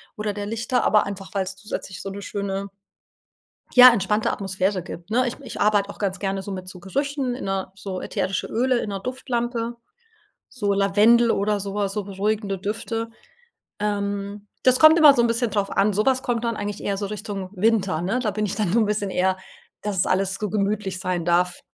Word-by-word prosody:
oder 210 Hz, 0 st, -2 dB
der 205 Hz, 0 st, -4 dB
Lichter, 225 Hz, +3 st, -1 dB
aber 215 Hz, -, +4 dB
einfach, 195 Hz, -1 st, -7 dB
weil's 195 Hz, 0 st, -2 dB
zusätzlich 195 Hz, -1 st, -6 dB
so 195 Hz, -, -5 dB
'ne 200 Hz, +1 st, -7 dB
schöne 200 Hz, -1 st, -4 dB, 1.0 s
ja, 255 Hz, 0 st, +11 dB
entspannte 210 Hz, +1 st, +1 dB
Atmosphäre 190 Hz, -1 st, -1 dB
gibt, 175 Hz, +2 st, -9 dB
ne. 250 Hz, +2 st, +2 dB
Ich 245 Hz, -, -5 dB
ich -, -, -7 dB
arbeite 205 Hz, -1 st, +3 dB
auch -, -, -9 dB
ganz 195 Hz, -2 st, -2 dB
gerne 195 Hz, -1 st, -2 dB
so 200 Hz, -, -7 dB
mit 185 Hz, -1 st, -6 dB
so 185 Hz, -1 st, -9 dB
Gerüchen 270 Hz, +6 st, -2 dB
in 250 Hz, -, -6 dB
a 190 Hz, -1 st, -2 dB
so 190 Hz, -1 st, -5 dB
ätherische 190 Hz, +1 st, -2 dB
Öle 250 Hz, +1 st, +1 dB
in 210 Hz, -, -3 dB
'ner 195 Hz, -1 st, -3 dB
Duftlampe, 240 Hz, -1 st, -3 dB, 0.7 s
so 205 Hz, -6 st, -1 dB
Lavendel 210 Hz, +4 st, +4 dB
oder 205 Hz, 0 st, +1 dB
so 200 Hz, 0 st, -5 dB
was, 200 Hz, -1 st, -1 dB
so 210 Hz, -2 st, -3 dB
beruhigende 200 Hz, 0 st, -2 dB
Düfte. 225 Hz, +3 st, -3 dB, 0.7 s
Ähm, 200 Hz, 0 st, -2 dB, 0.2 s
das 255 Hz, 0 st, +4 dB
kommt 315 Hz, +2 st, +8 dB
immer 295 Hz, -3 st, +8 dB
so 240 Hz, -, +3 dB
'n 235 Hz, -, +3 dB
bisschen 230 Hz, 0 st, 0 dB
drauf 200 Hz, -1 st, -1 dB
an. 200 Hz, +1 st, +2 dB
Sowas 255 Hz, +6 st, +2 dB
kommt 240 Hz, -1 st, -1 dB
dann 230 Hz, -1 st, -1 dB
eigentlich 205 Hz, 0 st, -4 dB
eher 200 Hz, -1 st, -1 dB
so 200 Hz, 0 st, -3 dB
Richtung 205 Hz, -2 st, -5 dB
Winter, 195 Hz, -4 st, +1 dB
ne? 225 Hz, +8 st, 0 dB
Da 215 Hz, -4 st, 0 dB
bin 210 Hz, +1 st, -1 dB
ich 195 Hz, -, -3 dB
dann 200 Hz, -4 st, -1 dB
so 230 Hz, -, +3 dB
'n 215 Hz, -, +2 dB
bisschen 205 Hz, -2 st, -1 dB
eher, 185 Hz, +1 st, +1 dB, 0.5 s
dass 205 Hz, -3 st, -2 dB
es -, -, +2 dB
alles 195 Hz, +1 st, +1 dB
so 210 Hz, -, -3 dB
gemütlich 200 Hz, -2 st, -1 dB
sein 180 Hz, -3 st, -2 dB
darf. 175 Hz, +1 st, +1 dB
205 Hz, 205 wpm, -23 LUFS, 195-225 Hz, 1.0 s, ja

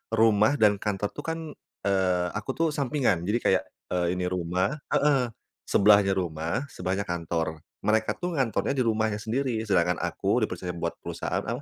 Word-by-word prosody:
rumah 110 Hz, +2 st, +4 dB
dan 105 Hz, -5 st, +4 dB
kantor 105 Hz, -1 st, -1 dB
tuh -, -, -8 dB
kan, 165 Hz, 0 st, -2 dB, 0.4 s
eee, 95 Hz, -2 st, +2 dB
aku 120 Hz, -, -3 dB
tuh 165 Hz, -, +2 dB
sampingan. 130 Hz, -, 0 dB
Jadi 110 Hz, +4 st, +1 dB
kayak, 95 Hz, -, +3 dB, 0.3 s
eee, 90 Hz, 0 st, +1 dB
ini 90 Hz, 0 st, -2 dB
rumah 90 Hz, -, 0 dB, 0.2 s
heeh, 140 Hz, -4 st, +3 dB, 0.4 s
...sebelahnya 100 Hz, -1 st, +6 dB
rumah, 85 Hz, -, -2 dB
sebelahnya 95 Hz, +2 st, -2 dB
kantor. 80 Hz, -2 st, -2 dB, 0.2 s
Mereka 110 Hz, +1 st, +1 dB
tuh 180 Hz, -1 st, -2 dB
ngantornya 135 Hz, 0 st, 0 dB
di 130 Hz, -, +2 dB
rumahnya 110 Hz, -2 st, +1 dB
sendiri. 115 Hz, +1 st, -1 dB
Sedangkan 90 Hz, -4 st, +2 dB
aku -, -, 0 dB
dipercaya 90 Hz, -, -3 dB
buat 85 Hz, 0 st, -3 dB
perusahaan -, -, -3 dB
apa? -, -, -3 dB
105 Hz, 160 wpm, -27 LUFS, 90-120 Hz, 0.4 s, sebelahnya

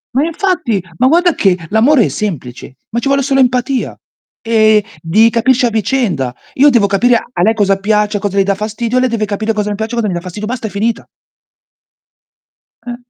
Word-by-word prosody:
Ma 275 Hz, -, +2 dB
infatti, 335 Hz, -, -1 dB, 0.2 s
ma 255 Hz, -, +3 dB
guarda 345 Hz, +3 st, +3 dB
che 185 Hz, -3 st, +2 dB
l'amore 235 Hz, +4 st, +3 dB
è -, -, 0 dB
semplice, 135 Hz, -, -6 dB
ma 235 Hz, -, -1 dB
ci 275 Hz, -, -3 dB
vuole 275 Hz, 0 st, +2 dB
solo 270 Hz, 0 st, +1 dB
empatia. 250 Hz, +1 st, 0 dB, 0.5 s
Ehm, 220 Hz, -1 st, +4 dB, 0.2 s
di 215 Hz, +8 st, +3 dB
capirci 250 Hz, +2 st, +2 dB
a -, -, +2 dB
vicenda. 205 Hz, -, -1 dB, 0.2 s
Io 285 Hz, +2 st, +5 dB
devo 235 Hz, -7 st, +3 dB
capire 235 Hz, +5 st, +2 dB, 0.2 s
a 175 Hz, -, -2 dB
lei 220 Hz, +5 st, +3 dB
cosa 195 Hz, -3 st, +1 dB
piace, 210 Hz, +1 st, 0 dB
cosa 200 Hz, 0 st, -3 dB
le 195 Hz, -, +4 dB
dà 200 Hz, 0 st, 0 dB
fastidio, 225 Hz, +4 st, -2 dB
lei 255 Hz, 0 st, +1 dB
deve 225 Hz, -2 st, -1 dB
capire 215 Hz, +2 st, -2 dB
cosa 210 Hz, -1 st, -2 dB
mi -, -, -2 dB
piace, 220 Hz, +3 st, -4 dB
cosa 225 Hz, -3 st, -1 dB
mi 185 Hz, -, -2 dB
dà 175 Hz, -, -3 dB
fastidio. 190 Hz, +4 st, -7 dB
Basta, 235 Hz, -2 st, -4 dB
è -, -, -7 dB
finita. 220 Hz, +3 st, -2 dB, 1.8 s
Eh. 240 Hz, -1 st, -5 dB
220 Hz, 195 wpm, -14 LUFS, 200-250 Hz, 1.8 s, Io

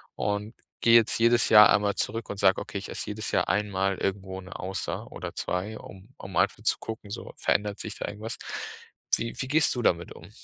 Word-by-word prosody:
und 105 Hz, +2 st, -2 dB, 0.3 s
gehe 115 Hz, 0 st, +6 dB
jetzt 115 Hz, 0 st, +2 dB
jedes 120 Hz, +1 st, +4 dB
Jahr 105 Hz, -2 st, +9 dB
einmal 100 Hz, 0 st, +2 dB
zurück 115 Hz, +1 st, -2 dB
und 100 Hz, -, -5 dB
sage, 95 Hz, -1 st, +4 dB
okay, 105 Hz, -1 st, -6 dB
ich -, -, -9 dB
esse -, -, -5 dB
jedes 105 Hz, +1 st, -4 dB
Jahr -, -, +1 dB
einmal 95 Hz, -2 st, 0 dB
irgendwo 95 Hz, -1 st, -3 dB
'ne 90 Hz, -, -11 dB
Auster 95 Hz, +1 st, -4 dB
oder -, -, -6 dB
2, 100 Hz, +4 st, -3 dB
um 95 Hz, +3 st, -13 dB
um 95 Hz, -1 st, -9 dB
einfach -, -, +2 dB
zu -, -, +2 dB
gucken, 110 Hz, -2 st, -7 dB
so, -, -, -7 dB
verändert 105 Hz, 0 st, 0 dB
sich 110 Hz, -1 st, -6 dB
da -, -, -4 dB
irgendwas? 110 Hz, +2 st, -6 dB, 0.8 s
Wie 115 Hz, -, -2 dB
wie 130 Hz, -, -3 dB
gehst 155 Hz, +3 st, +3 dB
du 120 Hz, -, -1 dB
damit 85 Hz, -5 st, +1 dB
um? 85 Hz, +5 st, -13 dB
105 Hz, 205 wpm, -27 LUFS, 95-110 Hz, 0.8 s, Jahr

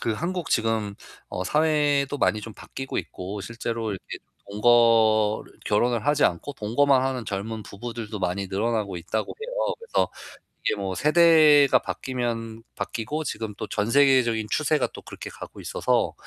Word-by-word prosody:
그 115 Hz, -, 0 dB
한국 175 Hz, +7 st, -3 dB
지금 110 Hz, -3 st, 0 dB, 0.3 s
어 90 Hz, -, -4 dB
사회도 145 Hz, -, +2 dB
많이 110 Hz, -, +2 dB
좀 110 Hz, 0 st, -9 dB
바뀌고 135 Hz, 0 st, -7 dB
있고 100 Hz, +3 st, -6 dB
실제로 115 Hz, -1 st, -4 dB
이렇게 95 Hz, -, -7 dB, 0.3 s
동거를 110 Hz, -1 st, +3 dB
결혼을 115 Hz, +2 st, +1 dB
하지 145 Hz, 0 st, +3 dB
않고 90 Hz, +11 st, 0 dB
동거만 130 Hz, +5 st, +2 dB
하는 130 Hz, -3 st, -2 dB
젊은 110 Hz, +2 st, -4 dB
부부들도 115 Hz, 0 st, -6 dB
많이 90 Hz, +2 st, -1 dB
늘어나고 105 Hz, -1 st, -1 dB
있다고 105 Hz, +6 st, -3 dB
해요. -, -, -2 dB
그래서 465 Hz, -, 0 dB, 0.6 s
이게 -, -, +2 dB
뭐 95 Hz, -2 st, -3 dB
세대가 155 Hz, -3 st, +6 dB
바뀌면 115 Hz, -3 st, -4 dB
바뀌고 145 Hz, +8 st, -3 dB
지금 110 Hz, -5 st, -4 dB
또 -, -, -5 dB
전 105 Hz, +1 st, -1 dB
세계적인 130 Hz, -6 st, +4 dB
추세가 155 Hz, -1 st, +1 dB
또 -, -, -10 dB
그렇게 -, -, -8 dB
가고 -, -, -10 dB
있어서. -, -, 0 dB
115 Hz, 330 characters per minute, -25 LUFS, 105-140 Hz, 0.6 s, 세대가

